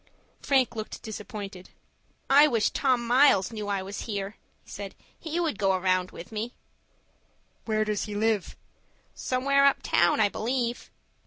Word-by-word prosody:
Frank 265 -4 +2
looked 215 -1 -6
disappointed. 205 -3 -7 0.6
"I 285 +2 +7
wish 230 -6 +1
Tom 255 -4 +1
Miles 240 -5 +4
knew 215 -2 -5
I 200 -2 -1
was 195 +2 -6
here," 200 -1 -4 0.3
he - - -21
said. 200 -1 -7 0.2
"He 325 +1 -3
would 320 - -1
go 195 -1 +3
around 185 -1 +1
with 175 - -11
me." 220 +3 -4 1.1
"Where 215 -1 +1
does 210 -1 -1
he 210 - -6
live?" 215 -2 0 0.6
"Somewhere 275 +2 +1
up 280 0 +3
town, 175 +4 +3
I 210 - +5
believe." 240 +3 -2
215 Hz, 150 wpm, -27 LUFS, 200-255 Hz, 1.1 s, I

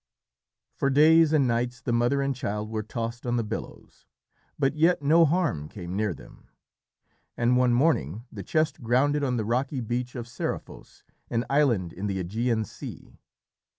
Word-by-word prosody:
For 135 - 0
days 155 +3 +6
and 145 -4 +3
nights 120 +1 -1
the 120 0 -2
mother 120 +4 +2
and 135 -1 -1
child 105 -4 -4
were 110 -1 -2
tossed 115 +2 -5
on 120 - +1
the 115 - 0
billows, 110 +1 -8 0.5
but 135 -1 +1
yet 165 0 +3
no 165 +4 +5
harm 150 - 0
came 90 -2 -7
near 105 0 0
them, 80 - -13 0.9
and 120 +1 +2
one 125 -1 +3
morning 120 - +1
the 100 - -7
chest 155 - 0
grounded 140 +5 +2
on 125 -3 0
the 110 - -1
rocky 130 +4 -1
beach 120 +2 -3
of 120 -2 -5
Seriphos, 120 - -6 0.3
an 115 +1 -1
island 120 - +2
in 100 +3 -4
the 100 -1 -2
Ægean 110 +4 -1
Sea. - - -10
120 Hz, 165 wpm, -26 LUFS, 110-140 Hz, 0.9 s, days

